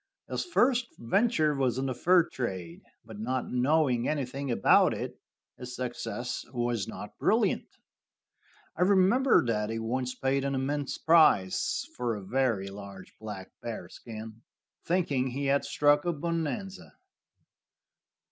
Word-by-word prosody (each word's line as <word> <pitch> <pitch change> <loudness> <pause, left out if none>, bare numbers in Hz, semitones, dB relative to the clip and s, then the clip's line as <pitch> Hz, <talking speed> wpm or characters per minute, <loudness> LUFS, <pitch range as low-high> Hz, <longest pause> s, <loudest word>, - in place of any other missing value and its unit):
His - - -2
first 250 -8 +2
venture 155 - +2
was 130 -4 0
in 135 - -1
the 130 - -1
fur 175 +6 +4
trade, 95 - -5 0.2
but 110 -2 -10
not 125 +3 -2
knowing 125 -1 +2
anything 140 -1 -3
about 120 - +4
it, - - -6 0.4
his 125 0 -7
success 125 0 -4
was 120 -4 -1
not - - -9
brilliant. - - +2 1.1
I - - -5
remember 200 - +4
that 105 -2 0
he 115 - -3
once 125 +3 -2
paid 135 +1 0
an 140 0 -1
immense 140 +1 -2
price 155 - +3
for 120 -2 -1
a 100 - -7
very 115 -3 0
large 100 -1 -10
black 105 -4 -8
bearskin, 110 0 -8 0.4
thinking 150 -7 0
he 135 +3 -3
had 140 +1 +2
struck 145 0 +3
a 175 - 0
bonanza. 170 +5 -4
130 Hz, 130 wpm, -29 LUFS, 115-155 Hz, 1.1 s, fur